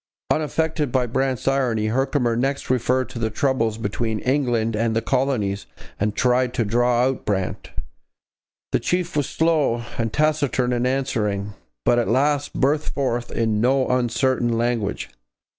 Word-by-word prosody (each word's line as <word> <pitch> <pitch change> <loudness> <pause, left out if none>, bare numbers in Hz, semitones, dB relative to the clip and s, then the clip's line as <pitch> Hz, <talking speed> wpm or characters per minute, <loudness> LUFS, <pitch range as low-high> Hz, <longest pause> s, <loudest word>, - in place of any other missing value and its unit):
Unaffected 155 -2 0
by 130 -1 +2
Brant's 130 +1 -1
irony, 125 -5 +1
Herkimer 130 -1 +1
next 135 +2 -1
referred 130 +1 +1
to 115 - -7
the 110 -1 0
troubles 115 -2 0
between 110 +1 -2
England 120 -3 0
and 110 +1 0
the 115 - +2
colonies, 120 -8 0 0.3
and 105 +1 0
tried 125 +1 +2
to 115 - +1
draw 120 +3 +2
out 130 0 0
Brant. 95 -3 -2 1.0
The - - +2
chief 180 -1 -1
was 145 -2 0
slow 155 -8 +1 0.2
and 115 -1 0
taciturn 145 -3 +1
in 120 +1 +1
answering, 105 -7 -1 0.3
but 120 - +4
at 120 - 0
last 145 +3 +1
burst 145 +3 0
forth 120 -3 -1
in 110 -2 0
no 130 +2 +2
uncertain 125 0 +1
language. 115 - -1
125 Hz, 145 wpm, -22 LUFS, 115-135 Hz, 1.0 s, but